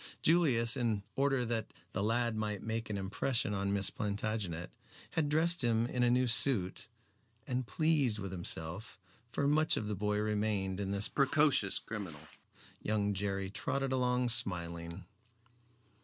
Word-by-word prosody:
Julius, 135 -9 +4
in 115 -6 0
order 135 -2 +2
that 115 -2 -2 0.2
the 100 - -1
lad 115 +2 +1
might 105 -2 -2
make 115 0 -3
an 105 - -2
impression 105 +3 0
on 100 0 -1
Miss 100 -2 +3
Plantagenet, 100 -5 -3 0.4
had 155 -3 0
dressed 165 +2 +2
him 115 -1 +2
in 125 +1 -2
a 120 - +4
new 125 +1 +3
suit, 115 -5 +2 0.6
and 125 -1 -2
pleased 150 -8 +2
with 100 -3 -5
himself 90 +3 -5 0.3
for 140 +3 0
much 155 +2 +3
of 105 - -2
the 105 - -2
boy 105 +1 0
remained 105 -3 0
in 100 -1 -2
this 100 +1 +2
precocious 140 -7 +3
criminal 95 -9 -6 0.6
young 105 -1 0
Jerry 95 -1 -2
trotted 135 +5 -1
along 125 -1 +1
smiling. 85 -5 -1
110 Hz, 145 wpm, -33 LUFS, 100-125 Hz, 0.6 s, Julius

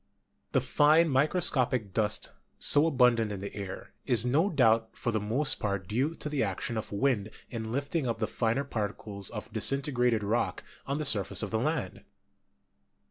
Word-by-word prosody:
The - - +3
fine 155 +3 +4
microscopic 130 - +2
dust 105 -1 0 0.3
so 145 +2 +3
abundant 125 -7 +3
in 100 - -5
the 100 - -7
air 100 -2 -7
is 120 -1 +4
no 150 +10 +2
doubt 115 - +2
for 120 - -2
the 110 - 0
most 120 +8 +2
part 100 -3 -2
due 130 +10 -1
to - - -4
the 150 -2 -1
action 105 +3 -2
of 110 - -5
wind 110 -1 0 0.2
in 110 -2 -5
lift 140 +3 -3
ing 160 -6 0
up 115 - -1
the 110 - -1
finer 115 +5 -1
particles 105 -4 -5
of - - -8
disintegrated 125 -5 +1
rock 110 +4 -1 0.2
on 140 +1 -1
the 155 - -3
surface 100 - +1
of - - -4
the - - 0
land. - - -2
120 Hz, 175 wpm, -29 LUFS, 105-140 Hz, 0.3 s, fine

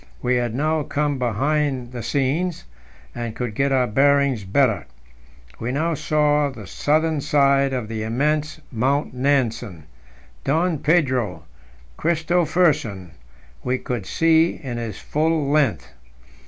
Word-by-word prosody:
We 125 0 +2
had 120 -2 -1
now 155 +3 +1
come 145 -1 -1
behind 130 +1 0
the 125 -2 -6
scenes, 150 +8 -1 0.5
and 120 -2 -5
could 120 -3 -3
get 140 +5 0
our 130 -2 +3
bearings 135 0 +2
better. 110 +2 +1 0.7
We 115 +2 -3
now 160 +5 0
saw 150 -1 +1
the 115 -7 -10
southern 155 - 0
side 140 -1 +3
of 125 -4 -3
the 110 0 -4
immense 150 +8 -1
Mount 135 +5 0
Nansen; 120 - 0 0.6
Don 160 +2 +1
Pedro 130 - +1 0.6
Christophersen 160 - +1 0.5
we 125 +1 0
could 120 -7 -4
see 165 - +3
in 125 -3 -4
his 115 -4 -5
full 155 -2 0
length. 145 -6 +1
140 Hz, 125 wpm, -22 LUFS, 120-150 Hz, 0.7 s, our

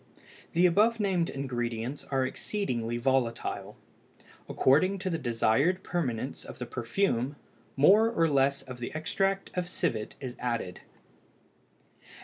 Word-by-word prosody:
The 175 +2 +4
above 215 +6 +4
named 185 -5 +1
ingredients 120 -1 -3
are 135 -1 +1
exceedingly 125 - -2
volatile; 125 -2 -1 0.7
according 185 +9 +3
to 185 0 -3
the 165 - -1
desired 135 +8 +2
permanence 130 -7 -2
of - - -10
the 125 - -4
perfume, 125 +2 -1 0.4
more 205 +11 +6
or 165 -8 +2
less 140 -1 +2
of 130 -1 -9
the 120 - -4
extract 195 +5 -1
of 180 -1 -2
civet 110 -10 -2
is 130 -2 -6
added. 115 -7 -3
135 Hz, 125 wpm, -29 LUFS, 120-180 Hz, 0.7 s, more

